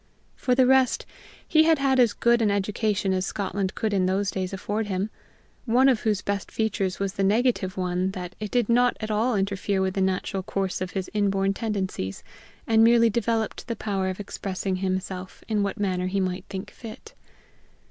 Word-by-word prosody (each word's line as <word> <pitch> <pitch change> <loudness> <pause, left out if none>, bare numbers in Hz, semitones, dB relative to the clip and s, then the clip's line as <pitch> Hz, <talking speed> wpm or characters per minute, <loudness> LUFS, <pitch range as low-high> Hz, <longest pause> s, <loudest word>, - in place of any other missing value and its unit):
For 250 - +1
the 260 0 +5
rest, 260 -1 +3 0.4
he 315 -1 +5
had 325 -1 +5
had 270 -1 +2
as 240 -3 +5
good 235 0 +3
an 215 - +3
education 200 0 0
as 185 0 0
Scotland 200 -1 -2
could 220 -2 -1
in 185 -2 +2
those 195 +1 0
days 185 -1 -3
afford 205 +2 -2
him, 195 +2 -2 0.5
one 255 +3 +4
of 255 -5 +4
whose 210 -3 0
best 200 -2 -2
features 195 -4 -1
was 195 -1 -1
the 195 - -1
negative 205 -2 +1
one 180 0 0
that 180 -2 -6
it 210 -1 -4
did 245 -1 +1
not 245 +1 +3
at 215 0 -4
all 225 +3 +1
interfere 195 0 0
with 190 -1 0
the 195 - -1
natural 190 +1 0
course 190 0 -2
of 185 - -2
his 190 -2 -2
inborn 195 -2 +1
tendencies, 190 - -3 0.4
and 225 0 +4
merely 230 0 +5
developed 225 +1 -1
the 230 - -2
power 195 -4 -1
of 185 - -5
expressing 195 -2 -3
himself 185 0 -4
in 215 -2 +1
what 200 +2 -2
manner 185 -3 0
he 195 +2 -1
might 185 0 -2
think 195 +1 -6
fit. 245 - -11
200 Hz, 190 wpm, -25 LUFS, 190-225 Hz, 0.5 s, the